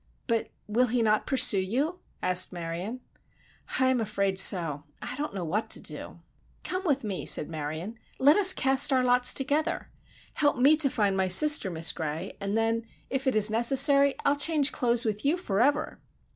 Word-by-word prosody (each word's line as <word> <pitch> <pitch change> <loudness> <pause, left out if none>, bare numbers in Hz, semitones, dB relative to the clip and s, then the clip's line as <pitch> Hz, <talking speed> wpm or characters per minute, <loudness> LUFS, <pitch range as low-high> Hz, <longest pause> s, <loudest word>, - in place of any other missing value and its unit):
"But 230 -2 -2 0.2
will 235 +4 0
he 240 0 -1
not 215 -1 0
pursue 245 -6 +5
you," 270 - -3 0.2
asked 180 0 +2
Marion. 175 +7 -6 0.8
"I 260 - +3
am 255 -2 0
afraid 200 -3 -2
so. 165 -7 +1 0.2
I - - -6
don't 290 -5 -5
know 185 - -4
what 205 +8 -3
to - - -1
do!" - - -10 0.4
"Come 370 +1 -4
with 280 -6 0
me," 200 -4 -5
said - - +4
Marion. 160 +8 -6 0.2
"Let 285 +3 +4
us 390 -2 +5
cast 270 -3 +1
our 260 -1 +2
lots 250 0 +4
together! 300 +5 -2 0.4
Help 290 -2 0
me 275 +5 +4
to 300 -3 +2
find 205 -6 -1
my 190 -1 0
sister, 295 - +4
Miss 165 -1 +2
Gray, 155 0 -6
and 200 +2 -2
then, 225 +1 -1 0.3
if 270 +1 -3
it 260 - +1
is 215 0 +3
necessary, 270 +4 +3
I'll 280 - +3
change 295 -1 0
clothes 240 -2 +1
with 210 -1 -3
you 295 +5 +1
forever!" 280 - -1
235 Hz, 180 wpm, -26 LUFS, 195-275 Hz, 0.8 s, pursue